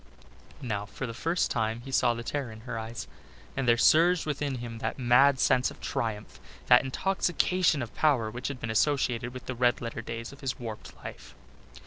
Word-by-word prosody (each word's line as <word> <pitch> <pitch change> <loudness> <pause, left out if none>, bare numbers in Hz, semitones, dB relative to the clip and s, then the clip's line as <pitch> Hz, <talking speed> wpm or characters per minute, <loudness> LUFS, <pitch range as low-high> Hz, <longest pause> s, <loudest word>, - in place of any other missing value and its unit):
Now 105 -4 -3
for 105 +6 -5
the 115 - -5
first 165 +8 0
time 110 0 -1
he 135 - -9
saw 120 -2 +3
the 115 - -5
terror 135 -1 -3
in 110 0 -11
her 115 -1 -5
eyes, 110 +1 -6 0.5
and 135 -2 -1
there 120 0 +5
surged 170 +7 +5
within 145 -2 -2
him 120 -2 -6
that - - -3
mad 130 +2 +5
sense 125 -1 +3
of - - -12
triumph, 110 -2 -4 0.3
that 125 - +6
intoxication 175 0 +1
of 115 - -9
power 130 -8 +2
which 125 +3 -4
had 140 -3 -5
been 115 - -3
associated 125 -1 +1
with 130 0 -9
the 130 - -3
red 120 0 +2
letter 115 -1 -5
days 115 +2 -6
of 140 - -15
his 135 -3 -2
warped 110 -3 -8
life. - - -9
125 Hz, 195 wpm, -28 LUFS, 115-140 Hz, 0.5 s, that